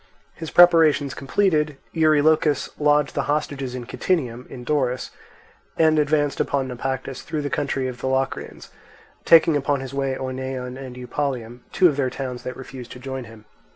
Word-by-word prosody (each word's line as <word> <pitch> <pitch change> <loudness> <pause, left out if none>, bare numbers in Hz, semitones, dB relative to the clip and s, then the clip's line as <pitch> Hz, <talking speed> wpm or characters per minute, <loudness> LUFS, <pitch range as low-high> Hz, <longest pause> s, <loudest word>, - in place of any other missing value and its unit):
His 160 -2 -7
preparations 165 -5 +5
completed, 150 -1 0 0.2
Eurylochus 155 -1 +3
lodged 150 -1 +3
the - - 0
hostages 140 -3 -2
in 125 -1 -6
Kytinium, 125 -7 -2
in 125 - -9
Doris, 130 -3 -1 0.7
and 155 -1 +4
advanced 145 -1 +1
upon 135 -2 0
Naupactus 130 +1 -4
through 155 -2 -4
the 145 - -3
country 135 -2 -1
of 125 -1 -7
the - - -2
Locrians, 130 0 -3 0.5
taking 165 -1 +6
upon 145 0 0
his 135 0 -7
way 135 -1 -1
Oeneon 130 -1 -5
and 130 -2 -8
Eupalium, 125 -2 -4
two 185 - +5
of 145 -4 0
their 135 -3 +1
towns 125 -2 -5
that 125 -1 -6
refused 130 -2 -9
to 125 - -11
join 130 0 -6
him. 110 -1 -14
135 Hz, 160 wpm, -23 LUFS, 130-150 Hz, 0.7 s, taking